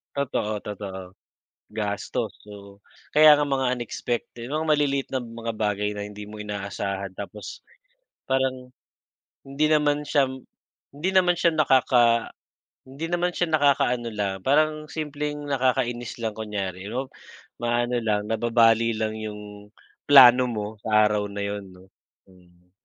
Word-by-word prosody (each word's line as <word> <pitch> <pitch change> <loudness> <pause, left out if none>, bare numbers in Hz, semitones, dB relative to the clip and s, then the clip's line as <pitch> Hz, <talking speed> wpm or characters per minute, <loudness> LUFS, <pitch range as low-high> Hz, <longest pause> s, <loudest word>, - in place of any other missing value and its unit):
Totoo, 115 -6 -2
totoo. 100 -2 -6 0.7
Gastos, 105 -2 -3
oo. 100 -1 -12 0.4
Kaya 155 0 +9
nga 150 - +1
mga 135 -2 0
unexpected, 120 0 -5
mga 155 +2 -1
maliliit 145 -3 +1
na 130 - -1
mga 115 0 -6
bagay 105 -1 -1
na 105 0 -5
hindi 105 0 -9
mo 105 +1 -10
inaasahan 100 -1 -4
tapos 105 +1 -8 0.7
parang 130 -1 -1 0.7
hindi 140 +3 0
naman 150 -1 +2
siya 140 -3 +3 0.7
hindi 165 +7 -1
naman 180 -2 +4
siya 170 0 +2
nakaka 125 -6 +3 0.6
hindi 140 +5 -6
naman 175 0 0
siya 175 -2 -1
nakaka-ano 140 -5 +2
lang, 100 -3 -2
parang 155 +3 +1
simpleng 150 -1 -4
nakakainis 125 -3 0
lang 110 - 0
kunyari, 100 -3 -5
'no. 130 +5 -4 0.5
Maano 120 +1 0
lang, 105 -3 0
nababali 115 0 +3
lang 110 0 -2
'yong 105 -1 -8 0.4
plano 130 -3 +8
mo 105 -4 -3
sa 110 -1 +3
araw 105 -1 0
na 100 0 -5
'yon 100 -1 -4
'no, 95 +1 -19 0.3
hmm. 90 -1 -24
120 Hz, 130 wpm, -24 LUFS, 105-140 Hz, 0.7 s, Kaya